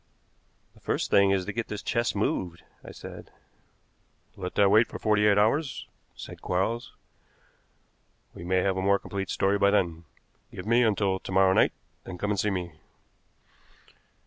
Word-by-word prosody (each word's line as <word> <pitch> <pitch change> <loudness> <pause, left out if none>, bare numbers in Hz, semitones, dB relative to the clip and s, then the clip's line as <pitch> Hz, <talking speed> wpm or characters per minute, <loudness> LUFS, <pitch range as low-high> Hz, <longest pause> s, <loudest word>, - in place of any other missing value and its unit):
"The - - -21
first - - -2
thing 100 0 +5
is 95 -2 +1
to 105 - -5
get 115 +1 -3
this 105 -1 -6
chest 115 -2 -1
moved," 90 -4 -2 0.2
I - - -11
said. - - -11 1.1
"Let 90 -1 -6
that 100 -1 +4
wait 110 +3 +5
for - - -8
forty 105 -1 +2
eight 100 -1 +4
hours," 120 +5 +1 0.3
said - - -10
Quarles. 110 +7 -2 1.4
"We - - -10
may 90 +1 +1
have 95 -1 0
a - - -1
more 100 +1 +3
complete 100 -1 -5
story 100 +1 +1
by 100 0 +4
then. 85 -5 0 0.5
Give 90 - -8
me 115 +2 +3
until 100 -4 +1
to - - -9
morrow 95 0 +4
night, - - +3 0.3
then 90 - -8
come 105 +3 -2
and 100 - -1
see 105 - +1
me." 90 -4 -4
100 Hz, 170 wpm, -27 LUFS, 95-105 Hz, 1.4 s, thing